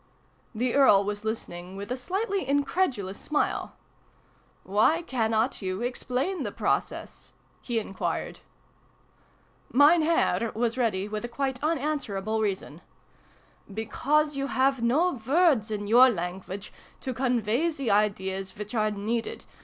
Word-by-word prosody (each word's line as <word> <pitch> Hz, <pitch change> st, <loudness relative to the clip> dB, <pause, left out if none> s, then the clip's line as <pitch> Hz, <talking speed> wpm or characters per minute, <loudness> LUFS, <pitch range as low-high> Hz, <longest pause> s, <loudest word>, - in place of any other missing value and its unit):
The 245 Hz, +2 st, 0 dB
Earl 260 Hz, -8 st, +6 dB
was 205 Hz, +1 st, -3 dB
listening 185 Hz, -5 st, -5 dB
with 200 Hz, +4 st, -7 dB
a -, -, +1 dB
slightly 390 Hz, -, -2 dB
in 285 Hz, +1 st, +2 dB
credulous 245 Hz, -, -1 dB
smile. 300 Hz, -, -1 dB, 0.4 s
" -, -, -35 dB, 0.2 s
Why 320 Hz, +10 st, +4 dB
cannot 225 Hz, -4 st, 0 dB
you 190 Hz, +3 st, -3 dB
explain 255 Hz, +8 st, -2 dB
the -, -, -3 dB
process? -, -, -3 dB
" -, -, -36 dB
he 240 Hz, -2 st, -2 dB
enquired. 200 Hz, -3 st, -3 dB, 1.3 s
Mein 295 Hz, +5 st, +6 dB
Herr 310 Hz, -7 st, +1 dB
was 230 Hz, +1 st, 0 dB
ready 210 Hz, -6 st, 0 dB
with 210 Hz, +1 st, -4 dB
a -, -, -2 dB
quite 265 Hz, +2 st, -3 dB
unanswer 295 Hz, -8 st, -1 dB
able 215 Hz, +3 st, -1 dB
reason. 200 Hz, -3 st, -3 dB, 0.5 s
" -, -, -31 dB, 0.3 s
Because 290 Hz, +8 st, 0 dB
you 275 Hz, 0 st, -2 dB
have 265 Hz, -1 st, +1 dB
no 300 Hz, +10 st, +2 dB
ivords, 265 Hz, -, +2 dB
in 205 Hz, -1 st, -3 dB
your 245 Hz, +5 st, +7 dB
language, 190 Hz, 0 st, -5 dB, 0.3 s
to 260 Hz, -, -3 dB
convey 245 Hz, +3 st, +1 dB
the 275 Hz, -8 st, -2 dB
ideas 195 Hz, -2 st, 0 dB
which 210 Hz, +1 st, -6 dB
are 215 Hz, -2 st, +2 dB
needed. 215 Hz, +3 st, -3 dB
235 Hz, 140 wpm, -27 LUFS, 210-275 Hz, 1.3 s, your